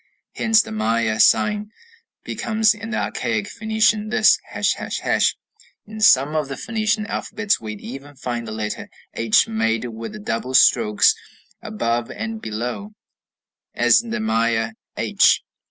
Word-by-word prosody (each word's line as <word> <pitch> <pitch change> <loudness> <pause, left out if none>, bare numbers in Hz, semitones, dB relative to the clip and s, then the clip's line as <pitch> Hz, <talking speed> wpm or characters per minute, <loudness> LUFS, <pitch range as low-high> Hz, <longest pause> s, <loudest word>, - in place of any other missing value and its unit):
Hence 225 -1 +3
the - - -10
Maya 110 0 0
sign 210 - +3 0.5
becomes 220 -1 +1
in 225 +1 -8
the 220 - -2
archaic 215 -3 -2
Phoenician 220 -1 0
this, 215 - +4
###. - - -2 0.8
In 215 0 -9
some 145 -7 +5
of 155 -2 0
the 135 - -6
Phoenician 215 -1 -1
alphabets 210 -1 -2
we 110 -1 -6
even 135 +7 -10
find 120 -3 -4
the - - -6
letter 110 -1 -5 0.2
h 115 -2 +3
made 115 +1 -1
with 115 - -7
the 215 - -8
double 130 - -3
strokes 105 -5 +5 0.5
above 115 +2 -2
and 220 0 -5
below, 125 - -5 0.8
as - - +4
in 235 - -10
the 240 +1 -2
Maya 115 - 0 0.3
h. - - +3
135 Hz, 140 wpm, -21 LUFS, -, 0.8 s, some